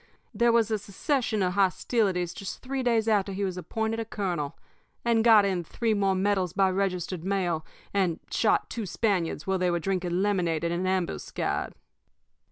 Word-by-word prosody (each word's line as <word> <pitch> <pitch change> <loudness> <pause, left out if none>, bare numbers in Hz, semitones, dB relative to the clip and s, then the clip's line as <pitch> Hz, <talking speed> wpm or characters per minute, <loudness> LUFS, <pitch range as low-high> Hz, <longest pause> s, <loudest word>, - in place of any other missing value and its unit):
There 235 0 +3
was 230 -1 +3
a 215 - +1
secession 215 +2 -1
of 180 -1 0
hostilities 190 -2 +1
just 195 -3 -7
three 265 +1 -2
days 230 -3 +2
after 205 -3 +2
he 200 +1 -2
was 185 -2 -1
appointed 220 +5 -2
a 225 - -2
colonel, 180 -9 -3 0.5
and 230 -1 +3
got 220 -3 +7
in 185 -3 0
three 225 +7 -1
more 195 -2 +2
medals 190 -2 +1
by 190 -1 +3
registered 185 -2 -2
mail, 180 -4 0 0.3
and 185 -5 +1
shot 220 - +2
two 225 -4 -4
Spaniards 180 -7 -1
while 190 -1 0
they 180 0 +2
were 175 - +1
drinking 180 0 -1
lemonade 175 -6 0
in 170 - 0
an 180 +2 -1
ambuscade. 185 -2 -2
195 Hz, 175 wpm, -27 LUFS, 180-220 Hz, 0.5 s, got